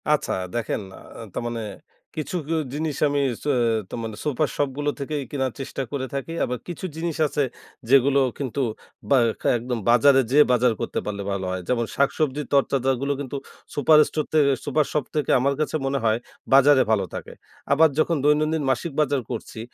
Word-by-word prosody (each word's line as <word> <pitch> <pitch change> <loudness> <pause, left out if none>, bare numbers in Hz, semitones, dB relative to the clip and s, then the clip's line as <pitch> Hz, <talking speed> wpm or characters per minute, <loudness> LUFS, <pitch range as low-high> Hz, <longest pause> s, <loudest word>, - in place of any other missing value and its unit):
আচ্ছা 150 -1 +2 0.2
দেখেন, 115 -2 -2 0.2
আ - - -12 0.3
তার - - -3
মানে 115 -1 -3 0.6
কিছু 155 +3 -3
কি 165 - -1 0.2
জিনিস 150 0 -2
আমি 145 0 0 0.2
স - - -12 0.4
তো - - -5
মানে 110 -2 -5
সুপার 150 +1 +1
শপগুলো 145 +1 -1
থেকেই 145 +1 -3
কেনার 135 -3 -1
চেষ্টা 135 0 -4
করে 140 -2 -2
থাকি। 140 +4 -4
আবার 125 - -2
কিছু 175 +1 -6
জিনিস 165 -1 -3
আছে, 145 0 0 0.5
যেগুলো 140 +1 +5 0.2
কিন্তু 140 0 -3 0.5
বা 140 - +5 0.4
একদম 120 0 -3
বাজারে 135 +3 +6
যেয়ে 150 +2 +7
বাজার 125 -1 +3
করতে - - -2
পারলে 100 -1 -4
ভালো 95 -1 -2
হয়। 95 0 -3
যেমন 120 -2 +1
শাকসবজি, 140 +1 +1
তরতাজাগুলো 135 -1 +1
কিন্তু 140 -1 -5 0.4
সুপার 150 +2 +5
স্টোর 155 - -2
থেকে, 145 -3 +4
সুপার 150 +1 +2
শপ 150 -3 0
থেকে 150 -3 0
আমার 140 +2 +2
কাছে 155 0 -1
মনে 135 +1 0
হয় 110 0 +3 0.4
বাজারে 135 0 +7
ভালো 100 -3 +2
থাকে। - - -7 0.4
আবার 160 +3 +6
যখন 165 +1 +2
দৈনন্দিন 155 +1 +2
মাসিক 135 +6 -1
বাজার 140 -2 +1
করছি, 115 -1 -6
140 Hz, 175 wpm, -24 LUFS, 125-150 Hz, 0.6 s, যেয়ে